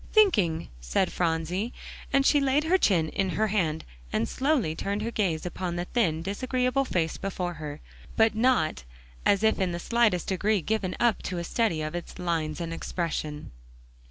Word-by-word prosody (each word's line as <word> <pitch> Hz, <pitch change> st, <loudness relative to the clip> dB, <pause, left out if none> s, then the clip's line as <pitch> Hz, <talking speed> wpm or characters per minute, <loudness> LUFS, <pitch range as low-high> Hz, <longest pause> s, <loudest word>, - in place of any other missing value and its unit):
"Thinking," 205 Hz, -, +3 dB
said -, -, 0 dB
Phronsie; 175 Hz, +6 st, -1 dB, 0.4 s
and 275 Hz, 0 st, +3 dB
she 290 Hz, 0 st, +5 dB
laid 275 Hz, +2 st, +2 dB
her 365 Hz, +4 st, +3 dB
chin 165 Hz, -, +3 dB
in 195 Hz, +2 st, -1 dB
her 220 Hz, 0 st, +2 dB
hand, 165 Hz, -6 st, 0 dB, 0.3 s
and 115 Hz, +1 st, 0 dB
slowly 265 Hz, -, +1 dB
turned 200 Hz, +5 st, -2 dB
her 230 Hz, -, -2 dB
gaze 180 Hz, -8 st, 0 dB
upon 180 Hz, 0 st, -3 dB
the 175 Hz, 0 st, -2 dB
thin, 170 Hz, -8 st, 0 dB
disagreeable 255 Hz, +6 st, 0 dB
face 165 Hz, -8 st, -1 dB
before 180 Hz, -2 st, -3 dB
her, 150 Hz, 0 st, -6 dB, 0.4 s
but 220 Hz, -1 st, +5 dB
not 220 Hz, -, +2 dB, 0.4 s
as 200 Hz, +1 st, +3 dB
if 220 Hz, 0 st, +3 dB
in 185 Hz, -2 st, 0 dB
the 170 Hz, -, -3 dB
slightest 225 Hz, -4 st, +2 dB
degree 205 Hz, +2 st, +1 dB
given 200 Hz, 0 st, -1 dB
up 240 Hz, -4 st, +2 dB
to 180 Hz, -, -4 dB
a 170 Hz, -, -2 dB
study 170 Hz, -4 st, 0 dB
of 155 Hz, +1 st, -4 dB
its 175 Hz, 0 st, -6 dB
lines 165 Hz, -3 st, -1 dB
and 165 Hz, -1 st, -3 dB
expression. 155 Hz, -3 st, -3 dB
185 Hz, 175 wpm, -27 LUFS, 165-230 Hz, 0.4 s, she